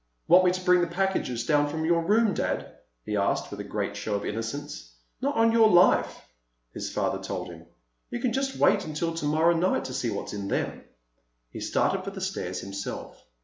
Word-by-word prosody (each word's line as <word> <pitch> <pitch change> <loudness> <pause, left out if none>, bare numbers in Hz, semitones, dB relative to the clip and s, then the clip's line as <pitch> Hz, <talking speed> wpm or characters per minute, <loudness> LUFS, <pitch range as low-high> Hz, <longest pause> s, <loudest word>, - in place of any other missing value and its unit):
"Want 180 +2 +7
me - - +6
to 185 0 -4
bring 180 -1 +5
the 175 - +1
packages 170 -10 -1
down 145 +1 +2
from 160 +1 -3
your 170 0 +3
room, 210 +3 +3
Dad?" - - -3 0.3
he 105 - -3
asked, 100 -1 0
with 100 - -7
a - - -3
great 100 0 -3
show 105 +1 -3
of 100 - -3
innocence. 115 - -5 0.3
"Not 280 +2 0
on 225 0 +4
your 225 -1 +5
life," 175 -1 +4 0.5
his - - -5
father - - -1
told - - -5
him. - - -13 0.4
"You 240 - -4
can 240 -1 0
just 270 +1 -1
wait 200 - +4
until 160 +2 -2
tomorrow 160 +1 +2
night 175 -2 +1
to 130 - -5
see 125 -2 -1
what's 100 -2 -4
in 100 -1 -4
them." - - -2 0.7
He - - -7
started 190 -1 0
for 195 - -4
the 195 0 -8
stairs 185 - -3
himself. 100 0 -7
165 Hz, 200 wpm, -27 LUFS, -, 0.7 s, Want